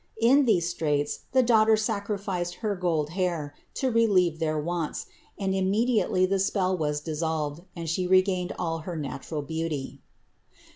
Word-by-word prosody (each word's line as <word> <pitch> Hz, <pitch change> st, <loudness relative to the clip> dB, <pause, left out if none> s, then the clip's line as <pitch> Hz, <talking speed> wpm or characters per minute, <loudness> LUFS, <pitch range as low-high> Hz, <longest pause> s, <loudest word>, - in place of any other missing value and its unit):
In 265 Hz, +5 st, +5 dB
these 180 Hz, -8 st, +3 dB
straits 150 Hz, -4 st, -1 dB
the 260 Hz, 0 st, +4 dB
daughter 220 Hz, -2 st, +5 dB
sacrificed 200 Hz, -5 st, -2 dB
her 205 Hz, -1 st, +1 dB
"gold 165 Hz, -5 st, 0 dB
hair" 170 Hz, -5 st, -2 dB, 0.2 s
to 260 Hz, -2 st, 0 dB
relieve 190 Hz, -8 st, +3 dB
their 155 Hz, -2 st, 0 dB
wants, 165 Hz, 0 st, -3 dB, 0.3 s
and 195 Hz, -1 st, -1 dB
immediately 195 Hz, 0 st, +2 dB
the 195 Hz, +1 st, 0 dB
spell 190 Hz, -1 st, +1 dB
was 150 Hz, -3 st, -1 dB
dissolved 155 Hz, -1 st, -2 dB
and 165 Hz, -1 st, -5 dB
she 180 Hz, +3 st, 0 dB
regained 185 Hz, -1 st, +3 dB
all 165 Hz, -2 st, -2 dB
her 170 Hz, +2 st, -6 dB
natural 145 Hz, 0 st, -4 dB
beauty. 160 Hz, -2 st, -4 dB
180 Hz, 145 wpm, -27 LUFS, 160-200 Hz, 0.3 s, In